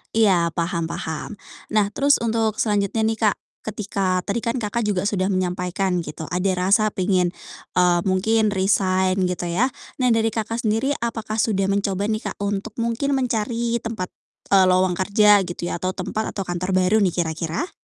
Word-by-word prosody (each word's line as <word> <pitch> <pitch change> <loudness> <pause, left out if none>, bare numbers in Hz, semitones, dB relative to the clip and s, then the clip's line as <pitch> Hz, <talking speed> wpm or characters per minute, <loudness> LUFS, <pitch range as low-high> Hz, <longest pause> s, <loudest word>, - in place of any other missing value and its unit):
Iya, 185 -7 +4
paham 170 -1 -1
paham. 160 +6 -5 0.3
Nah 215 -1 +3
terus 285 +1 +4
untuk 225 -2 0
selanjutnya 210 +1 +1
nih, 225 - +2 0.2
Kak, - - -2 0.3
ketika 195 -4 -2
tadi 225 +3 -1
kan, 235 +1 -1
Kakak, 230 0 -2
juga 200 -4 0
sudah 195 -2 0
menyampaikan 180 0 -1
gitu 160 0 -7
ada 180 +2 +1
rasa 200 +4 +3
pengen, 185 -2 +1 0.5
eee, 180 -1 +4
mungkin 215 +4 +2
resign 190 -1 +1
gitu 180 -1 -3
ya. 180 +10 +1 0.3
Nah 250 - +3
dari, 225 -1 +2
Kakak, 230 +2 -3
sendiri 225 +7 +1
apakah 225 -2 -3
sudah 195 -3 +1
mencoba 200 0 0
nih, 215 0 -2
Kak, - - -11
untuk 205 +1 -2
mungkin 235 +5 0
mencari 235 -2 0
tempat, 215 -5 -3 0.4
eee, 195 -1 +6
lowong 185 -1 +2
kerja 205 +1 +4
gitu 175 0 -5
ya - - -2
atau 185 +2 -2
tempat 215 +4 -3
atau 200 - -3
kantor 180 +1 -3
baru 185 +3 +3
nih 180 - 0
kira-kira? 165 - -2
200 Hz, 170 wpm, -22 LUFS, 185-220 Hz, 0.5 s, eee